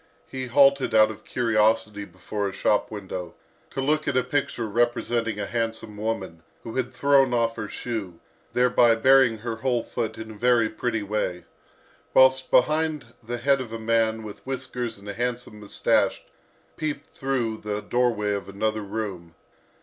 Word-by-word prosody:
He 130 -1 -5
halted 140 0 +4
out 110 0 +6
of 110 - -12
curiosity 110 -3 +1
before 100 +3 -4
a - - -7
shop 105 +1 +1
window, 95 -4 -6 0.3
to 135 - -4
look 150 +3 +1
at 140 -2 +1
a 130 - +3
picture 130 -2 -1
representing 115 -1 0
a 105 - -2
handsome 115 -2 -3
woman, 100 -6 -4 0.2
who 115 - -7
had 130 -1 -1
thrown 135 -1 +3
off 115 -1 +1
her 110 -2 -5
shoe, 100 -8 -5 0.3
thereby 125 -2 +4
baring 130 -1 +5
her 115 +1 -5
whole 120 0 0
foot 115 -2 -4
in 110 0 -7
a - - -8
very 115 0 +2
pretty 115 -1 -2
way; 100 -4 -2 0.7
whilst 130 0 +6
behind 155 +2 +2
her 120 0 -22
the 120 +1 -5
head 135 +2 +2
of 120 -3 -7
a 115 - -4
man 110 0 +1
with 105 -1 -9
whiskers 130 -3 -4
and 100 +1 -14
a 100 - -4
handsome 120 -1 -4
moustache 105 -1 +1 0.5
peeped 150 -2 -4
through 125 -5 -1
the 105 -1 -4
doorway 120 -4 +1
of 100 -1 -4
another 110 +2 -1
room. 100 -5 -5
115 Hz, 165 wpm, -25 LUFS, 105-125 Hz, 0.7 s, out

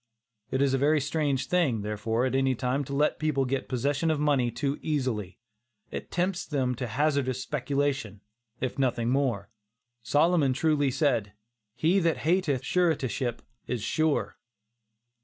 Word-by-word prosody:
It 130 +1 +1
is 135 -1 +2
a 135 - +2
very 150 +3 +3
dangerous 140 -1 0
thing, 140 - +1
therefore, 110 +3 -1
at 130 - -1
any 135 -1 +2
time, 130 +3 -1
to 140 - -5
let 150 +2 +1
people 150 -3 +1
get 135 +1 -2
possession 140 +5 0
of 155 -2 +1
money 140 -5 +2
too 135 +5 -2
easily; 125 - -2 0.5
it - - -6
tempts 180 +1 -1
them 130 -4 0
to 125 - -3
hazardous 135 0 0
speculations, 140 -6 -1 0.4
if 130 +2 -3
nothing 120 -3 +1
more. 120 -7 0 0.5
Solomon 145 +4 +3
truly 145 0 +2
said 125 -7 0 0.4
"he 170 +8 +3
that 165 -3 +1
hateth 160 -6 +1
suretiship 140 -9 0 0.2
is 120 -4 -3
sure." 155 +4 0
135 Hz, 145 wpm, -28 LUFS, 125-150 Hz, 0.5 s, very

